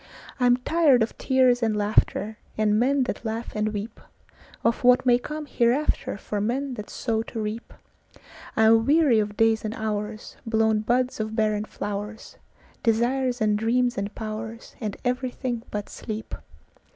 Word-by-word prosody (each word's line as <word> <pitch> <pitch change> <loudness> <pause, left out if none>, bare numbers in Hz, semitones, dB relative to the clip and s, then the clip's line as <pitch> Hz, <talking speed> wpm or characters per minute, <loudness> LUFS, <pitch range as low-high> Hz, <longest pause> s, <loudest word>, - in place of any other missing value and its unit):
I 250 - +4
am 245 0 +5
tired 280 -3 +3
of 220 - -4
tears 255 -2 +3
and 220 -2 +1
laughter, 210 +1 +1 0.2
And 215 0 +2
men 270 +3 +3
that 250 - -4
laugh 225 +1 -4
and 215 0 0
weepOf 220 +2 -5
what 250 +1 +5
may 245 -1 +5
come 300 +4 -6
hereafterFor 235 -6 0
men 260 +4 -1
that 210 -4 -7
sow 225 -2 -1
to 225 0 -6
reap:I 220 0 -6
am 225 +1 +5
weary 290 -6 +5
of 210 -1 -2
days 225 0 +3
and 215 0 -3
hours, 215 0 -4
Blown 220 -1 +2
buds 245 +3 0
of 215 0 -3
barren 215 -1 +1
flowers, 205 +1 -6 0.4
Desires 245 +2 +1
and 210 -1 +3
dreams 245 +2 +1
and 200 +1 -4
powersAnd 220 0 -6
everything 250 -1 -2
but 205 -1 -4
sleep. 220 -1 -7
225 Hz, 145 wpm, -25 LUFS, 215-250 Hz, 0.4 s, am